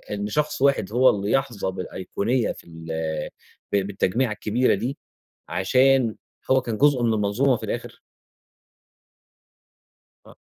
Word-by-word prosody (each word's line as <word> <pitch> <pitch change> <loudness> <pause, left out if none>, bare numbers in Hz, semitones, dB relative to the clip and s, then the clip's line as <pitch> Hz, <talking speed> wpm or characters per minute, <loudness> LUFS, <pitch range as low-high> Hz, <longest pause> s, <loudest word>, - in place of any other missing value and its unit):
إن 100 0 -3
شخص 150 +5 -1
واحد 135 -8 +2
هو 130 +2 +6
اللي 100 0 -1
يحظى 130 -8 0
بالأيقونية 100 +6 -2
في - - -11
ال 80 -1 -11 0.9
ب - - +4
بالتجميعة 105 +5 0
الكبيرة 110 +4 +1
دي 120 +8 -3 0.5
عشان 125 +7 +3 0.4
هو 130 0 +5
كان 115 -3 -4
جزء 140 -2 +3
من 115 -1 +2
المنظومة 110 +6 +2
في - - -12
الآخر؟ - - -5 2.3
آه. - - -15
115 Hz, 125 wpm, -24 LUFS, 100-130 Hz, 2.3 s, هو